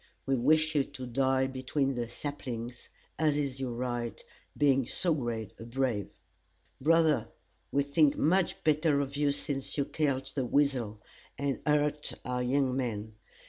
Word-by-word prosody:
We 135 - +2
wish 155 +5 +3
you 145 -2 +3
to 135 -2 -8
die 130 +2 +2
between 135 +1 -1
the 120 -2 -3
saplings, 125 -5 -6 0.3
as 155 -2 +3
is 140 -3 -2
your 130 -3 -2
right, 120 -1 -3 0.4
being 135 -4 +3
so 175 +3 +1
great 120 -7 -3
a - - -7
brave. 120 -3 -1 0.7
"Brother, 160 +1 +4 0.4
we 140 - +2
think 145 0 +3
much 180 +4 +2
better 155 -1 +3
of 140 -1 -2
you 145 0 +2
since 140 -1 -3
you 140 - +2
killed 135 -3 -1
The 135 - 0
Weasel, 125 -6 +1 0.3
and 140 -1 -1
hurt 150 0 +1
our 125 0 -1
young 130 +1 +1
men. 110 -4 -3
135 Hz, 150 wpm, -30 LUFS, 125-145 Hz, 0.7 s, Brother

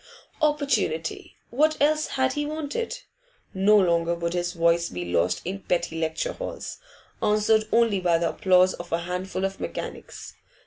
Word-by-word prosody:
Opportunity 280 - 0 0.2
what 310 +5 +2
else 305 +1 +2
had 260 -1 0
he 295 - -1
wanted? 315 - -4 0.5
No 200 +2 +5
longer 170 -3 +2
would 170 0 -3
his 175 0 -1
voice 170 0 +2
be 90 -1 -5
lost 85 0 0
in 190 +3 -3
petty 170 -3 -1
lecture 160 0 -2
halls, - - -6 0.4
answered 215 0 +3
only 230 -4 +3
by 175 -2 +2
the 170 0 0
applause 185 0 +3
of 175 0 -9
a 165 - 0
handful 180 +2 -3
of 195 0 -4
mechanics. - - -7
190 Hz, 150 wpm, -25 LUFS, 170-260 Hz, 0.5 s, No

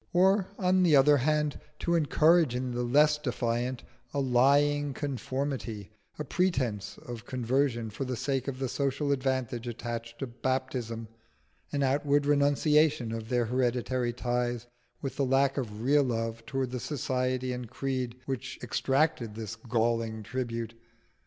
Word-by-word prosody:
or, 190 +2 +4
on 185 -1 +3
the 170 -5 +5
other 145 +1 +6
hand, 150 +2 +1 0.2
to 170 - -1
encourage 160 -2 +4
in 125 0 -2
the 120 0 -2
less 150 +5 +4
defiant 125 -2 -2 0.3
a - - +1
lying 140 +2 +3
conformity, 130 -6 -3 0.3
a 150 - -3
pretence 130 - -1
of 120 -2 -8
conversion 125 -1 0
for 110 +5 -5
the 130 -1 -3
sake 130 +1 -1
of 135 -2 -3
the 135 0 -2
social 140 +2 -1
advantages 130 -3 -1
attached 115 0 -5
to 135 - -3
baptism, 125 -2 -3 0.6
an 140 -1 0
outward 140 +1 +2
renunciation 145 -2 +3
of 115 -1 -5
their 120 -1 +2
hereditary 125 0 0
ties 120 0 -1 0.4
with 135 - -4
the 140 - +2
lack 135 +1 +3
of 110 -5 -4
real 145 +3 +4
love 115 -1 -2
towards 135 -2 -2
the 125 - -3
society 130 -2 -1
and 125 -2 -6
creed 130 -3 -2
which 130 -1 -4
exacted 130 0 0
this 110 0 -5
galling 115 -1 -1
tribute? 115 0 -3
130 Hz, 145 wpm, -29 LUFS, 120-140 Hz, 0.6 s, other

